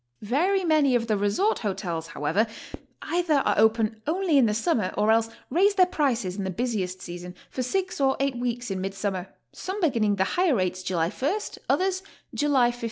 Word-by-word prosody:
Very 355 Hz, -, +1 dB
many 305 Hz, -6 st, +3 dB
of 235 Hz, -1 st, +1 dB
the 220 Hz, -2 st, +1 dB
resort 205 Hz, -, +1 dB
hotels, 175 Hz, -6 st, -3 dB
however, 165 Hz, +9 st, 0 dB, 0.6 s
either 345 Hz, -2 st, +1 dB
are -, -, +3 dB
open 220 Hz, 0 st, +2 dB
only 350 Hz, 0 st, +1 dB
in 245 Hz, -, +5 dB
the 210 Hz, -, +1 dB
summer 225 Hz, -, 0 dB
or 210 Hz, +1 st, +3 dB
else 225 Hz, 0 st, +3 dB, 0.2 s
raise 395 Hz, +7 st, +3 dB
their 370 Hz, -2 st, +6 dB
prices 245 Hz, -, -1 dB
in 200 Hz, -, -2 dB
the 190 Hz, -, -2 dB
busiest 190 Hz, -4 st, -2 dB
season, 175 Hz, +1 st, -8 dB, 0.2 s
for 255 Hz, -, -3 dB
six 365 Hz, +5 st, -2 dB
or 270 Hz, -1 st, +3 dB
eight 275 Hz, -1 st, 0 dB
weeks 245 Hz, -2 st, -3 dB
in 190 Hz, -1 st, -2 dB
mid 195 Hz, +1 st, -4 dB
summer, 195 Hz, -2 st, -3 dB, 0.2 s
some 380 Hz, +3 st, -5 dB
beginning 230 Hz, -, +2 dB
the 190 Hz, -, +2 dB
higher 350 Hz, -, +1 dB
rates 185 Hz, -2 st, -1 dB
July 175 Hz, -2 st, -1 dB
t, 255 Hz, -, -5 dB, 0.4 s
others 375 Hz, 0 st, +1 dB, 0.3 s
July 270 Hz, -5 st, +3 dB
15. 240 Hz, -, -12 dB
230 Hz, 190 wpm, -26 LUFS, 195-305 Hz, 0.6 s, their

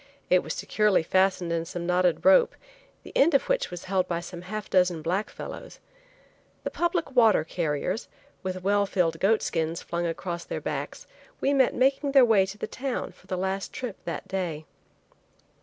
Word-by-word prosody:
It 180 Hz, 0 st, +6 dB
was -, -, -5 dB
securely 210 Hz, -5 st, +2 dB
fastened 185 Hz, -1 st, +2 dB
in 165 Hz, -1 st, 0 dB
some 170 Hz, +1 st, -6 dB
knotted 180 Hz, +2 st, +1 dB
rope, 470 Hz, +12 st, +6 dB, 0.5 s
the -, -, -11 dB
end 290 Hz, +2 st, +5 dB
of 275 Hz, -, +4 dB
which -, -, 0 dB
was 175 Hz, 0 st, -7 dB
held 185 Hz, -1 st, 0 dB
by 170 Hz, -1 st, -1 dB
some 175 Hz, 0 st, -8 dB
half 210 Hz, +3 st, -6 dB
dozen 180 Hz, -3 st, +2 dB
black 185 Hz, +6 st, -1 dB
fellows. -, -, -9 dB, 0.9 s
The -, -, -3 dB
public 345 Hz, -2 st, -1 dB
water 225 Hz, -9 st, +5 dB
carriers, 165 Hz, +4 st, -2 dB, 0.3 s
with 185 Hz, -1 st, -4 dB
well 200 Hz, +1 st, +2 dB
filled 165 Hz, -4 st, 0 dB
goat 215 Hz, +3 st, +3 dB
skins 165 Hz, 0 st, -2 dB
flung 170 Hz, 0 st, -2 dB
across 170 Hz, +1 st, -4 dB
their -, -, -4 dB
backs, -, -, -5 dB, 0.3 s
we 280 Hz, -, +1 dB
met 265 Hz, -3 st, +3 dB
making 275 Hz, +2 st, +2 dB
their 270 Hz, -3 st, +8 dB
way 205 Hz, -5 st, +4 dB
to 195 Hz, +2 st, -8 dB
the -, -, -3 dB
town 265 Hz, -1 st, -4 dB
for -, -, -23 dB
the 185 Hz, -, -2 dB
last 190 Hz, +1 st, -2 dB
trip 245 Hz, -6 st, -5 dB
that -, -, -5 dB
day. 175 Hz, -5 st, -3 dB
190 Hz, 180 wpm, -27 LUFS, 175-225 Hz, 0.9 s, their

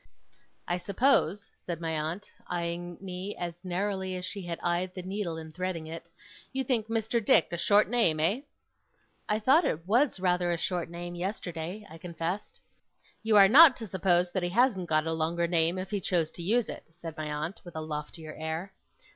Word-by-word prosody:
'I 175 Hz, +1 st, 0 dB
suppose,' 200 Hz, +1 st, +2 dB
said 170 Hz, -3 st, -5 dB
my 165 Hz, -1 st, -2 dB
aunt, 160 Hz, +5 st, -3 dB, 0.2 s
eyeing 175 Hz, 0 st, -3 dB
me 190 Hz, +1 st, -5 dB
as 175 Hz, 0 st, -5 dB
narrowly 190 Hz, +1 st, -2 dB
as 180 Hz, 0 st, -4 dB
she 200 Hz, +2 st, -5 dB
had 170 Hz, -1 st, -4 dB
eyed 175 Hz, +1 st, 0 dB
the 185 Hz, -, -5 dB
needle 185 Hz, -3 st, -3 dB
in 160 Hz, -1 st, -8 dB
threading 180 Hz, -1 st, -3 dB
it, 165 Hz, +1 st, -8 dB, 0.4 s
'you 265 Hz, 0 st, -1 dB
think 235 Hz, -4 st, 0 dB
Mr. 225 Hz, 0 st, 0 dB
Dick 175 Hz, -, +5 dB
a 170 Hz, -, -2 dB
short 205 Hz, +4 st, +4 dB
name, 220 Hz, -10 st, +3 dB
eh?' 195 Hz, -, +2 dB, 0.9 s
'I 210 Hz, 0 st, +2 dB
thought 275 Hz, +10 st, +5 dB
it 170 Hz, -, -1 dB
was 240 Hz, +1 st, +3 dB
rather 180 Hz, -1 st, +1 dB
a 170 Hz, -, 0 dB
short 175 Hz, 0 st, -2 dB
name, 175 Hz, +1 st, -6 dB
yesterday,' 180 Hz, +1 st, -4 dB
I 165 Hz, -2 st, -12 dB
confessed. 170 Hz, +3 st, -4 dB, 0.6 s
'You 220 Hz, -1 st, +3 dB
are 195 Hz, -1 st, +9 dB
not 280 Hz, +5 st, +9 dB
to 225 Hz, -, -6 dB
suppose 180 Hz, -2 st, +2 dB
that 185 Hz, -, -1 dB
he 175 Hz, -, -1 dB
hasn't 205 Hz, -3 st, +2 dB
got 155 Hz, 0 st, +2 dB
a 160 Hz, -, -1 dB
longer 165 Hz, +2 st, 0 dB
name, 170 Hz, +1 st, +2 dB
if 185 Hz, +2 st, -5 dB
he 205 Hz, -2 st, -1 dB
chose 170 Hz, -3 st, 0 dB
to -, -, -9 dB
use 225 Hz, +7 st, +2 dB
it,' -, -, -7 dB
said 165 Hz, -1 st, -9 dB
my 155 Hz, -1 st, -4 dB
aunt, 155 Hz, +6 st, -4 dB
with 175 Hz, -2 st, -11 dB
a 160 Hz, -, -3 dB
loftier 155 Hz, +1 st, -6 dB
air. 160 Hz, +5 st, -4 dB
180 Hz, 195 wpm, -29 LUFS, 165-205 Hz, 0.9 s, are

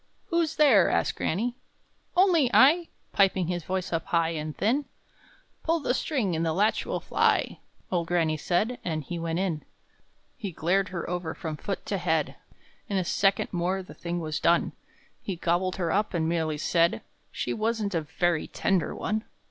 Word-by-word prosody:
"Who's 335 Hz, -2 st, +1 dB
there?" 255 Hz, -, +6 dB
asked -, -, +1 dB
granny. 235 Hz, +8 st, -1 dB, 0.6 s
"Only 350 Hz, -8 st, +5 dB
I!" 325 Hz, +6 st, +6 dB, 0.3 s
Piping 190 Hz, -2 st, +3 dB
his 175 Hz, 0 st, -2 dB
voice 185 Hz, +1 st, -3 dB
up 165 Hz, -, -1 dB
high 165 Hz, -1 st, +2 dB
and 155 Hz, -1 st, -4 dB
thin. 265 Hz, +7 st, +1 dB, 0.8 s
"Pull 330 Hz, +1 st, +1 dB
the 250 Hz, -, +1 dB
string, 245 Hz, -, 0 dB
and 160 Hz, -, 0 dB
the 160 Hz, -1 st, +1 dB
latch 210 Hz, +5 st, +1 dB
will -, -, -1 dB
fly!" -, -, +1 dB, 0.3 s
Old 170 Hz, -2 st, 0 dB
granny 165 Hz, -2 st, +1 dB
said; 195 Hz, +10 st, 0 dB
and 155 Hz, -3 st, -2 dB
he 170 Hz, +4 st, -5 dB
went 165 Hz, 0 st, -2 dB
in. 175 Hz, -5 st, -1 dB, 0.7 s
He 205 Hz, -6 st, -5 dB
glared 185 Hz, +4 st, +1 dB
her 175 Hz, -2 st, -4 dB
over 175 Hz, -2 st, -3 dB
from 160 Hz, -2 st, -4 dB
foot 195 Hz, +6 st, -5 dB
to 200 Hz, -, -2 dB
head; 160 Hz, -4 st, 0 dB, 0.6 s
In 200 Hz, -, 0 dB
a 185 Hz, -, 0 dB
second 195 Hz, +2 st, +1 dB
more 185 Hz, +2 st, 0 dB
the -, -, -12 dB
thing 175 Hz, 0 st, -4 dB
was 155 Hz, -2 st, -3 dB
done! 170 Hz, 0 st, +3 dB, 0.5 s
He 195 Hz, -, -4 dB
gobbled 175 Hz, +2 st, 0 dB
her 170 Hz, -3 st, -1 dB
up, 205 Hz, 0 st, 0 dB
and 160 Hz, -1 st, +1 dB
merely 160 Hz, -2 st, 0 dB
said, 170 Hz, +3 st, +2 dB, 0.3 s
"She -, -, -2 dB
wasn't 220 Hz, -2 st, -1 dB
a 165 Hz, -, +1 dB
very 160 Hz, +2 st, 0 dB
tender 190 Hz, -3 st, 0 dB
one!" 215 Hz, +1 st, -2 dB
180 Hz, 175 wpm, -27 LUFS, 165-210 Hz, 0.8 s, there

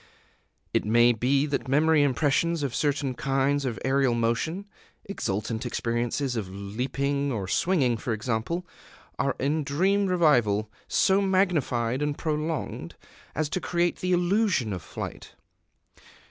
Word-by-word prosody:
It -, -, +2 dB
may 120 Hz, +3 st, +4 dB
be 135 Hz, +5 st, +1 dB
that 140 Hz, -2 st, -2 dB
memory 150 Hz, +3 st, +4 dB
impressions 145 Hz, +3 st, +1 dB
of 135 Hz, -4 st, -2 dB
certain 145 Hz, -2 st, 0 dB
kinds 135 Hz, +2 st, 0 dB
of 120 Hz, -5 st, -2 dB
aerial 135 Hz, -2 st, +2 dB
motion, 120 Hz, +12 st, -1 dB, 0.4 s
exultant 110 Hz, -, -3 dB
experiences 120 Hz, +2 st, -1 dB
of 105 Hz, -5 st, -3 dB
leaping 135 Hz, +8 st, -2 dB
or 100 Hz, -6 st, -3 dB
swinging, 135 Hz, -, +2 dB
for 115 Hz, -, -4 dB
example, 115 Hz, +10 st, -2 dB, 0.5 s
are 140 Hz, -, +1 dB
in 150 Hz, +3 st, 0 dB
dream 190 Hz, +8 st, +1 dB
revival 120 Hz, -, +2 dB, 0.2 s
so 195 Hz, 0 st, +3 dB
magnified 155 Hz, -11 st, +1 dB
and 150 Hz, -1 st, -1 dB
prolonged 155 Hz, 0 st, -3 dB, 0.4 s
as 155 Hz, +1 st, 0 dB
to 185 Hz, -, -2 dB
create 175 Hz, 0 st, 0 dB
the 185 Hz, -, -2 dB
illusion 180 Hz, -, +2 dB
of 90 Hz, -, -5 dB
flight. -, -, -8 dB
140 Hz, 130 wpm, -26 LUFS, 120-160 Hz, 0.5 s, may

